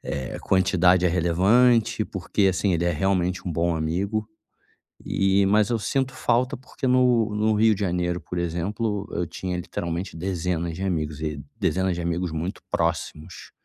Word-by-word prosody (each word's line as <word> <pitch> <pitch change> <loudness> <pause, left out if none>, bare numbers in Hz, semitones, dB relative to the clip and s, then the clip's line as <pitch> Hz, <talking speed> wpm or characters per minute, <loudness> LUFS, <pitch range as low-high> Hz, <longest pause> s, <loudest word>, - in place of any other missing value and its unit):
eh, 65 -2 -5
quantidade 95 -1 +3
é - - +4
relevante, 110 +7 +3
porque 95 +1 0
assim, 95 +1 +1
ele 85 0 0
é 85 - +2
realmente 90 +2 0
um 90 - -2
bom 85 +1 0
amigo. 95 +7 -1 0.8
E 95 0 +2
mas 105 +1 +3
eu 120 - 0
sinto 130 +4 -1
falta 130 +2 +1
porque 130 +2 -6
no 125 -4 +3
no 110 +1 +2
Rio 110 +1 +4
de 100 - -8
Janeiro, 90 -2 0
por 90 - -6
exemplo, 100 +5 -2
eu 90 - -1
tinha 90 +2 -4
literalmente 85 0 -4
dezenas 85 -1 -2
de 90 - -6
amigos 80 -5 -2
e 75 -3 -4 0.2
dezenas 95 0 +1
de - - -4
amigos 85 0 -2
muito 80 +4 -4
próximos. 80 +3 -3
95 Hz, 165 wpm, -24 LUFS, 85-105 Hz, 0.8 s, é